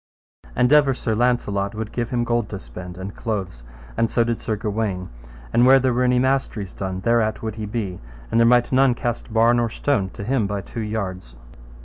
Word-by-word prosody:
And 125 +3 +3
ever 140 -3 +5
Sir 115 -3 -2
Launcelot 105 -4 0
would 110 0 -5
give 120 -1 -2
him 120 -1 0
gold 120 -2 0
to 100 - -5
spend, 90 -1 -9
and 95 +2 -7
clothes, 95 - -4 0.3
and 115 - +1
so 120 - +2
did 115 -1 -2
Sir 110 - -2
Gawaine, 105 -4 -3 0.4
and 115 +1 +5
where 130 +2 +7
there 130 -1 +1
were 125 - 0
any 125 0 +3
masteries 125 -7 0
done, 95 -1 -4
thereat 115 0 +1
would 110 -1 -3
he 105 -1 -5
be, 100 -4 -4 0.3
and 115 - +3
there 115 - +5
might 120 0 +4
none 130 -1 +4
cast 120 -1 -4
bar 115 +1 +4
nor 120 -1 +1
stone 105 -5 0
to - - -6
him 115 -1 0
by 100 0 -3
two 115 - -7
yards. 95 - -4
115 Hz, 210 wpm, -22 LUFS, 100-120 Hz, 0.4 s, where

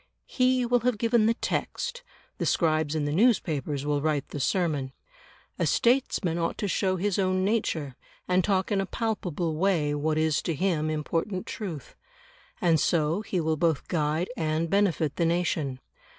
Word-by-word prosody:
He 255 -1 +2
will 245 +1 +3
have 245 -1 0
given 230 0 +3
the 230 - +2
text, 485 - -3 0.4
the - - -1
scribes 155 -2 +1
in 150 -2 0
the 145 - -1
newspapers 155 - +1
will 145 -1 0
write 150 -2 -1
the 145 - -5
sermon. 145 -4 0 0.7
A - - +2
statesman 235 -9 +1
ought 165 - -1
to 205 - -2
show 190 0 +1
his 200 +1 -1
own 185 -1 +1
nature, 165 - -1 0.3
and 185 0 +2
talk 190 0 0
in 200 -1 +2
a 195 - -3
palpable 180 -9 -2
way 165 -5 +1
what 155 +1 0
is 155 -1 +2
to 165 - -2
him 155 -2 0
important 165 +5 -2
truth. 170 - -6 0.7
And 165 -3 +3
so 160 +5 +1
he 195 -4 -2
will 160 -1 0
both 160 -2 0
guide 160 +3 0
and 160 -3 -1
benefit 185 -7 +1
the 170 - +2
nation. 160 -6 -1
170 Hz, 165 wpm, -27 LUFS, 155-200 Hz, 0.7 s, will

